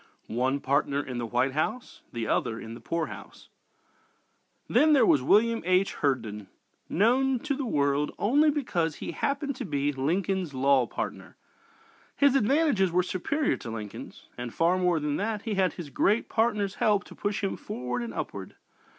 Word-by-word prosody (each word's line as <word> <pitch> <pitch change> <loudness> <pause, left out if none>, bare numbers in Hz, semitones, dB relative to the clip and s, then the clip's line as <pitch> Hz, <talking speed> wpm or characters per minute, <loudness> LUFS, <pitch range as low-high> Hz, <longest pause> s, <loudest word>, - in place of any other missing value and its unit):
ONE 130 +4 0
PARTNER 140 +1 0
IN 125 -2 -5
THE 120 - -3
WHITE 125 +4 +1
HOUSE, 195 - -3
THE 115 -2 -3
OTHER 115 0 0
IN 115 - -8
THE 115 - -9
POOR 165 -1 -2
HOUSE - - -11 1.2
Then 310 0 +4
there 275 - +5
was 140 - +4
William 225 - +3
H. 185 +2 +2
Herndon, 115 -8 -2 0.4
known 255 +7 +3
to 300 -1 -1
the 270 -2 -3
world 145 -4 +1
only 290 +9 +3
because 175 - -1
he - - -6
happened 280 0 -2
to - - -4
be 145 -3 -1
"Lincoln's 170 +3 -1
law 135 -1 +3
partner." - - -6 0.8
His 280 -2 +4
advantages 270 - +2
were 180 +1 +2
superior 280 - -1
to - - -8
Lincoln's. 110 -2 -8
And 120 -1 -4
far 175 +7 +2
more 180 -3 +2
than 150 -1 -1
that, 210 0 -2
he 220 - -2
had 190 -2 +1
his 160 -6 -8
great 215 +10 +1
partner's 210 -3 +1
help 205 -2 +3
to - - -13
push 205 0 -3
him 195 - -1
forward 125 0 -4
and 120 -1 -5
upward. 100 -3 -6
175 Hz, 170 wpm, -27 LUFS, 135-225 Hz, 1.2 s, there